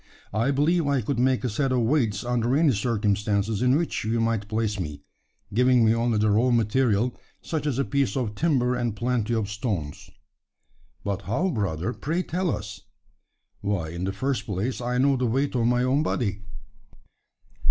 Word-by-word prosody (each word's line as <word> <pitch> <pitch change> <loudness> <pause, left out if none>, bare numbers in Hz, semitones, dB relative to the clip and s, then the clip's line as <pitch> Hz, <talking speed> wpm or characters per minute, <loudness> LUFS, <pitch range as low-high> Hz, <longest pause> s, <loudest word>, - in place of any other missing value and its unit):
I 115 +5 +1
believe 150 +4 +2
I 140 -2 +2
could 120 +3 -2
make 130 +1 +2
a - - +1
set 135 +5 0
of 125 -1 +2
weights 115 -5 +1
under 120 +1 +1
any 155 -2 +4
circumstances 105 -1 0
in 125 +1 +4
which 165 +2 -1
you 115 +2 0
might 115 -2 0
place 110 -1 -1
me 75 -5 -5 0.5
giving 125 +1 +4
me 110 - +4
only 115 -1 +1
the 105 0 +2
raw 115 +5 +3
material, 120 0 +2 0.3
such 155 -2 -2
as 135 -4 -1
a 140 - +1
piece 140 -1 0
of 120 -5 -1
timber 125 -2 +1
and 120 -3 -1
plenty 120 0 0
of 110 -3 -1
stones." 105 - -4 0.9
"But 100 -1 -2
how, 175 - +1
brother? 100 - -2
Pray, 165 +8 -2
tell 180 +1 -1
us!" 105 -6 -4 0.8
"Why, 100 -6 -2
in 85 +2 -4
the 95 - -1
first 130 +7 -2
place, 110 +6 -2
I 125 +1 -1
know 135 +1 +3
the 125 -1 0
weight 135 +5 0
of 120 -2 +1
my 125 0 +2
own 130 +3 +2
body." 105 -10 -1
120 Hz, 180 wpm, -25 LUFS, 105-130 Hz, 0.9 s, any